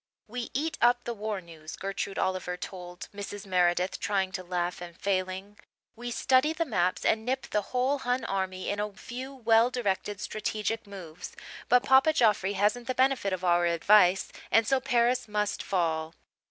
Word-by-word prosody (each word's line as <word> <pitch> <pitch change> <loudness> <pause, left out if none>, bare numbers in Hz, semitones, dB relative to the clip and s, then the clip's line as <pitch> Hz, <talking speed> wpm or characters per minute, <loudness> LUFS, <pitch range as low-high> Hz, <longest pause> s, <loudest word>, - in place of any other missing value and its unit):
"We 240 +1 -5
eat 315 +3 -1
up 245 +1 +4
the 235 - -3
war 210 -2 -4
news," 160 -3 -10
Gertrude 195 0 -4
Oliver 185 -1 -1
told 180 -1 -8
Mrs. 205 0 -7
Meredith, 180 -1 +1
trying 195 -2 0
to 185 0 -5
laugh 180 0 -2
and 170 -1 -9
failing. 190 +1 -2 0.4
"We 240 +1 -6
study 260 +5 +3
the 330 +1 -1
maps 185 - 0
and 220 0 +2
nip 260 +3 -2
the 210 - +2
whole 260 +3 +1
Hun 245 -1 -1
army 190 -1 -2
in 205 - -3
a 210 0 -2
few 255 +5 -7
well 230 -1 +4
directed 205 -4 -2
strategic 215 +1 -3
moves. 180 -5 -9 0.3
But 250 0 +5
Papa 270 +4 +5
Joffre 210 -7 +3
hasn't 210 +5 +1
the 255 - -1
benefit 260 -6 +2
of 185 -1 -3
our 175 0 +3
advice 180 +2 +4 0.2
and 225 0 +4
so 270 +1 +3
Paris 245 -2 +1
must 210 -1 -1
fall." 165 -3 -1
205 Hz, 170 wpm, -28 LUFS, 185-245 Hz, 0.4 s, But